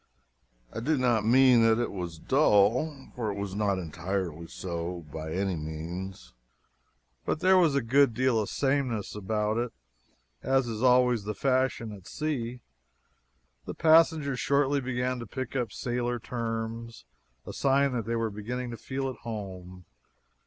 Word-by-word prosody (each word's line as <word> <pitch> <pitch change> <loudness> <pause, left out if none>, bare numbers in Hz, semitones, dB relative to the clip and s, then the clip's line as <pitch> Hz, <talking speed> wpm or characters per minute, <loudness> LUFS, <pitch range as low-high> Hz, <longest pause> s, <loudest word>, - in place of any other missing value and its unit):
I - - -4
do 150 +6 +1
not 120 -4 +2
mean 125 0 +6
that 115 -1 +4
it 120 - -1
was 90 -4 -5
dull, 130 - +2
for 115 -3 -2
it 100 - -6
was 100 -1 -4
not 100 -1 +1
entirely 85 -1 -4
so 85 -1 -5
by 80 0 -5
any 95 +1 -1
means 80 -1 -6 0.9
but - - -1
there 190 +2 +5
was 160 -6 +3
a 140 - +1
good 130 0 +4
deal 130 -2 +2
of 105 - -2
sameness 130 -6 -1
about 105 +1 -1
it. 120 -1 -2 0.7
As 135 -1 +2
is 110 -1 -4
always 125 -4 +4
the 105 0 -3
fashion 130 -2 0
at 100 -3 -11
sea, 125 -6 -3 1.0
the - - -6
passengers 155 -4 +4
shortly 140 0 +2
began 125 0 -2
to 115 - -7
pick 130 +4 -5
up 120 -5 -1
sailor 120 +1 -2
terms 115 - -5 0.4
a - - -7
sign 140 0 +2
that 120 -4 -2
they 115 - 0
were 115 -1 -1
beginning 120 +4 -4
to 115 - -6
feel 135 +2 -3
at 130 -3 -5
home. 95 -5 -7
115 Hz, 155 wpm, -28 LUFS, 100-130 Hz, 1.0 s, mean